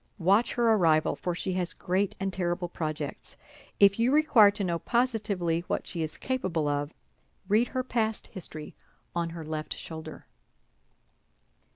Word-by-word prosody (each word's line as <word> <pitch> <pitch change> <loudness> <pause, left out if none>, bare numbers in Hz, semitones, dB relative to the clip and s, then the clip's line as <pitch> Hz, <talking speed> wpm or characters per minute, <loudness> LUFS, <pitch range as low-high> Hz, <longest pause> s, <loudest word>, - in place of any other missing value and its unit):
Watch 200 +5 +3
her 235 -2 +3
arrival, 160 -6 +3
for 175 -1 -3
she 185 +1 -2
has 180 -1 -1
great 190 +2 -1
and 195 -1 -2
terrible 175 0 -1
projects. 155 -4 -5 0.4
If 200 +1 +6
you 240 +3 +3
require 285 -8 +6
to 200 0 -3
know 170 -2 -1
positively 205 -9 0
what - - -2
she 170 - -4
is 155 -1 -4
capable 185 - -1
of, 145 +1 -1 0.6
read 215 +4 +3
her 255 -1 -2
past 225 -4 -1
history 155 -5 -8 0.4
on 170 -1 0
her 165 -1 -7
left 155 0 -4
shoulder." 160 -1 -8
185 Hz, 150 wpm, -28 LUFS, 165-220 Hz, 0.6 s, If